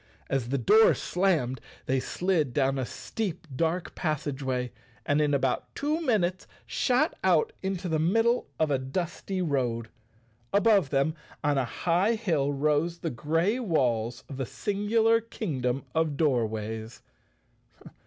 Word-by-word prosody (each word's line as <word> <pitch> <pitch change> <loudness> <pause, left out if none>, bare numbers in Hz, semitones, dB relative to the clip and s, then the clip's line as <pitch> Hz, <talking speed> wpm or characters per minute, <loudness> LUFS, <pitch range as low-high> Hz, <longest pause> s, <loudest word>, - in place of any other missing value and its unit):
As 130 -3 0
the 140 - +1
door 215 - +6
slammed 160 -10 0 0.2
they 130 +1 +1
slid 160 -4 0
down 135 -1 +2
a 130 - -2
steep 195 -6 -4
dark 165 +4 -1
passageway 135 -5 -2 0.3
and 145 +1 +2
in 150 -1 +2
about 135 -2 0
two 305 +3 -1
minutes 185 - 0 0.2
shot 250 -1 +1
out 175 -5 +3
into 190 -1 -2
the 160 -2 0
middle 225 +9 +2
of 155 -2 +2
a 135 - +2
dusty 175 +7 -3
road. 120 -7 -1 0.6
Above 200 -6 +4
them 140 +3 +1 0.3
on 145 -2 +2
a 130 - +1 0.2
high 180 +7 +3
hill 160 -10 0
rose 150 +4 +1
the 165 -2 -3
grey 165 - 0
walls 120 - 0
of 135 - -8
the 135 - -2
singular 220 +3 +2
Kingdom 140 - -3
of 160 -3 0
Doorways. 110 -5 -1
155 Hz, 135 wpm, -28 LUFS, 130-190 Hz, 0.6 s, door